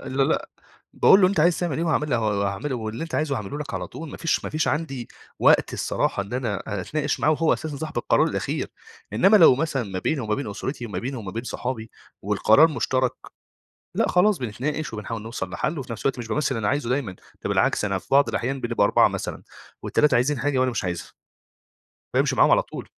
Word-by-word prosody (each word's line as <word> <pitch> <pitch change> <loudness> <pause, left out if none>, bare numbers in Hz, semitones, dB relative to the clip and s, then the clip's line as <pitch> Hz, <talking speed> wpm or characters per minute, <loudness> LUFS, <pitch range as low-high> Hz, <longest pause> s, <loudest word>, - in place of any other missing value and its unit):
لا، 135 0 0
لا، - - 0 0.4
باقول 195 - +6
له 185 - +6
أنت 190 -5 0
عايز 170 +1 +3
تعمل 170 -6 -1
إيه؟ 165 - 0
وهاعمل 150 -5 +1
وهاعمله، 105 +3 -1
واللي 110 +2 -5
أنت 165 - -6
عايزه 150 -2 0
هاعمله 110 +6 -5
لك 145 -2 -6
على - - -3
طول 160 -2 -9
ما - - -8
فيش 165 - 0
ما - - -4
فيش 155 0 0
عندي 140 -5 -2 0.3
وقت - - +4
الصراحة 100 - -1
إن 100 - -11
أنا 120 -6 -2 0.2
أتناقش 145 - -2
معاه، 150 - +3
وهو 155 +1 +2
أساسًا 155 -2 -3
صاحب 155 +2 -4
القرار - - +3
الأخير. - - -2 0.4
إنما 195 +4 +5
لو 165 -9 +8
مثلًا 140 -1 -1
ما 95 -4 -5
بيني 145 +9 -1
وما 110 -3 -1
بين 130 -2 -4
أسرتي، 120 +4 -5
وما 100 -5 -4
بيني 130 +7 -4
وما 105 -5 -6
بين 115 +2 -4
صحابي، 120 -3 -4 0.3
والقرار 145 +9 +5
مُشتَرَك، 130 -2 0 0.8
لأ، - - +2
خلاص 190 +2 +3
بنتناقش 130 +5 -3
وبنحاول 110 +1 -5
نوصل 110 -4 -5
لحل، 150 - -2
وفي 130 -2 -7
نَفْس - - -8
الوقت 135 -2 0
مش 120 - -5
بامثل 140 +7 0
اللي - - -2
أنا 105 - -1
عايزه 145 0 0
دايمًا. 125 -5 -1 0.3
ده - - -2
بالعكس - - +2
أنا 100 -2 0
في - - -13
بعض 140 +1 +5
الأحيان 135 +2 -2
بنبقى 120 -3 +1
4 - - +5
مثلًا، - - -5 0.4
و3 150 - +2
عايزين 130 +3 +2
حاجة 140 -1 0
وأنا 130 0 +2
مش 115 - -3
عايزها. 85 -2 -4 1.0
بامشي - - +2
معاهم - - +5
على - - +5
طول. - - -9
130 Hz, 215 wpm, -24 LUFS, 110-150 Hz, 1.0 s, لو